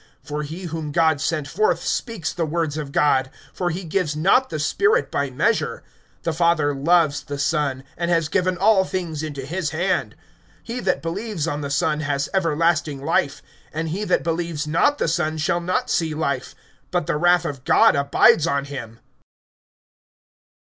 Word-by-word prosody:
(34)For 150 0 -3
he 160 +6 -7
whom 160 -3 -4
God 160 -2 +2
sent 155 -3 -1
forth 205 +9 +1
speaks 225 -10 -2
the 170 -3 -2
words 160 -2 -1
of 150 -3 -5
God; 135 -2 +2 0.2
for 180 -2 -1
he 175 +3 -4
gives 165 -2 -1
not[3:34] 190 +12 +3
the 155 -3 -4
Spirit 420 - +2
by 140 -1 -1
measure. 165 - 0 0.4
(35)The 165 -2 -1
Father 170 -4 +2
loves 150 +1 +2
the 145 - -5
Son, 145 -3 0
and 170 0 -2
has 165 -3 +2
given 185 +2 0
all 195 +1 +4
things 175 -5 -4
into 145 -4 -5
his 170 +2 -2
hand. 175 +5 -1 0.5
(36)He 240 +2 -4
that 185 - +1
believes 175 -1 -3
on 150 -2 -2
the 140 - -4
Son 155 +1 +1
has 145 -2 -1
everlasting 160 -5 +1
life; 145 -3 0 0.3
and 160 +1 -3
he 190 +6 -3
that - - +1
believes 165 -2 -2
not 170 - +2
the - - 0
Son 160 -1 0
shall 170 +3 0
not 185 +9 -1
see 160 -7 0
life, 140 -4 -2 0.3
but 175 -3 -1
the - - 0
wrath 175 +1 +3
of 140 -5 -5
God - - +5
abides 140 +3 +4
on 140 -3 0
him. 120 -5 -8
160 Hz, 175 wpm, -22 LUFS, 145-175 Hz, 0.5 s, God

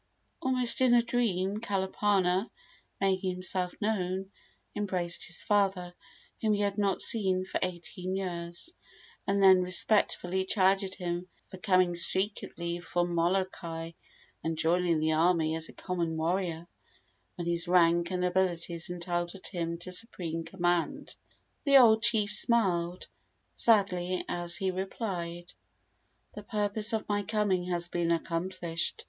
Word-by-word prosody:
Almost 255 -2 +5
in 250 -2 +5
a 235 - +4
dream, 205 -5 -1
Kalapana, 195 -1 0 0.5
making 190 -1 0
himself 185 0 -2
known, 190 -3 -2 0.4
embraced 185 -4 -2
his 175 - 0
father, 195 -4 0 0.5
whom 215 -1 +2
he 205 - 0
had 200 0 -1
not 200 -2 0
seen 190 -4 +2
for - - -3
eighteen 180 +1 -4
years, 175 - -4 0.5
and 195 0 +1
then 190 -1 +7
respectfully 185 0 +1
chided 190 0 +1
him 175 -1 -4 0.2
for 185 - -9
coming 185 -2 +2
secretly 175 -1 0
from 175 +1 -2
Molokai 170 -2 -2 0.5
and 165 0 -2
joining 170 0 +1
the 155 +1 +1
army 160 -1 +2
as 160 0 -1
a - - -12
common 170 -3 -3
warrior, 170 0 -2 0.7
when 175 - -5
his 170 0 +1
rank 170 -1 +3
and 180 -1 -1
abilities 175 -2 -1
entitled 175 +1 -4
him 170 -2 -3
to 175 +2 -8
supreme 175 -5 -2
command. 175 - -2 0.5
The 280 -1 +6
old 220 -4 +6
chief 220 -3 +3
smiled 185 -6 +2 0.5
sadly 185 -5 +2
as 175 0 0
he 190 0 -1
replied: 180 -3 -5 0.8
"The 210 - -8
purpose 210 0 +1
of 220 -1 -2
my 205 -1 0
coming 200 -3 0
has 175 -1 -1
been 175 -1 -2
accomplished. 170 0 -2
185 Hz, 130 wpm, -29 LUFS, 175-200 Hz, 0.8 s, then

